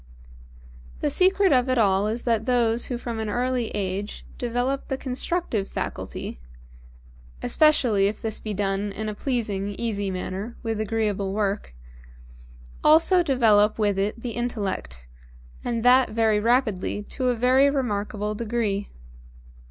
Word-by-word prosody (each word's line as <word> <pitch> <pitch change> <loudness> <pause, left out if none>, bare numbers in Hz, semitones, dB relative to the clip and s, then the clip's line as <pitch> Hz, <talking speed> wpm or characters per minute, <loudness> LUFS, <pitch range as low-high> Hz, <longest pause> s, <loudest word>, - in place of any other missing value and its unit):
The - - 0
secret 380 -1 +4
of 255 0 +3
it 255 - +2
all 200 -2 +3
is 225 +3 -3
that 225 -2 +1
those 235 -2 +2
who 245 - -3
from 235 -2 -5
an 220 -1 -3
early 245 +1 0
age 200 0 -4
develop 245 +3 -1
the 265 - -2
constructive 255 - -1
faculty - - -5 1.0
(especially 245 -10 +3
if 210 +1 -3
this 220 -1 -3
be 215 -2 -5
done 200 +1 -1
in 215 +2 -4
a 215 - -2
pleasing, 205 -5 -2
easy 205 -4 -2
manner, 190 +4 -5
with 225 -2 -2
agreeable 210 -3 -1
work) 200 - -2 1.1
also 330 +4 +5
develop 225 -8 +3
with 205 -3 +1
it 205 +4 -1
the 235 0 -4
Intellect, 200 - -4 0.6
and 235 -2 -2
that 255 +1 +6
very 220 -1 +2
rapidly 215 -4 0
to 255 +4 -3
a 250 - +2
very 255 +4 +4
remarkable 210 -5 -2
degree. 215 -2 -2
225 Hz, 135 wpm, -24 LUFS, 205-250 Hz, 1.1 s, that